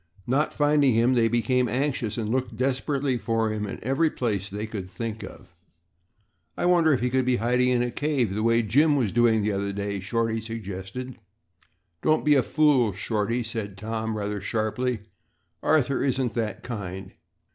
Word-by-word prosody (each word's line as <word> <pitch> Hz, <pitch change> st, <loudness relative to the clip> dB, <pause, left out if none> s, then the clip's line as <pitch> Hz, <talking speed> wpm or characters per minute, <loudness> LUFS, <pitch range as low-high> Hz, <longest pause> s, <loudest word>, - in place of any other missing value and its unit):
Not 135 Hz, +5 st, +1 dB
finding 145 Hz, -4 st, +3 dB
him, 120 Hz, +3 st, +3 dB
they 115 Hz, -2 st, +3 dB
became 120 Hz, +2 st, +1 dB
anxious 125 Hz, -5 st, -1 dB
and 110 Hz, -2 st, -2 dB
looked 125 Hz, 0 st, -2 dB
desperately 135 Hz, 0 st, 0 dB
for 115 Hz, +1 st, 0 dB
him 105 Hz, -1 st, -3 dB
in -, -, -5 dB
every 135 Hz, +7 st, +2 dB
place 105 Hz, -8 st, -2 dB
they 105 Hz, +2 st, -4 dB
could 100 Hz, -4 st, -6 dB
think 115 Hz, +2 st, -5 dB
of. -, -, -11 dB, 1.0 s
"I -, -, -1 dB
wonder 175 Hz, -3 st, +4 dB
if 130 Hz, -5 st, +2 dB
he 125 Hz, 0 st, 0 dB
could 130 Hz, 0 st, +2 dB
be 125 Hz, 0 st, +2 dB
hiding 125 Hz, +3 st, +2 dB
in 125 Hz, -1 st, +2 dB
a 120 Hz, -, -2 dB
cave 135 Hz, -7 st, 0 dB
the 105 Hz, -, -2 dB
way 115 Hz, +1 st, +3 dB
Jim 145 Hz, +8 st, +3 dB
was 120 Hz, -8 st, +1 dB
doing 115 Hz, -2 st, +3 dB
the 105 Hz, -, +1 dB
other 100 Hz, 0 st, -2 dB
day," 100 Hz, 0 st, -3 dB
Shorty 115 Hz, +3 st, -1 dB
suggested. 110 Hz, +3 st, -6 dB, 0.8 s
"Don't 155 Hz, 0 st, +2 dB
be 150 Hz, -, +5 dB
a 135 Hz, -, +5 dB
fool, 135 Hz, -8 st, +3 dB
Shorty," 110 Hz, +4 st, -1 dB
said 110 Hz, -4 st, -5 dB
Tom, 110 Hz, +1 st, -3 dB
rather 105 Hz, -1 st, -3 dB
sharply. 110 Hz, +3 st, -1 dB, 0.6 s
"Arthur 140 Hz, -4 st, +2 dB
isn't 130 Hz, -3 st, 0 dB
that 110 Hz, -3 st, -3 dB
kind. 95 Hz, -5 st, -6 dB
115 Hz, 175 wpm, -25 LUFS, 105-130 Hz, 1.0 s, be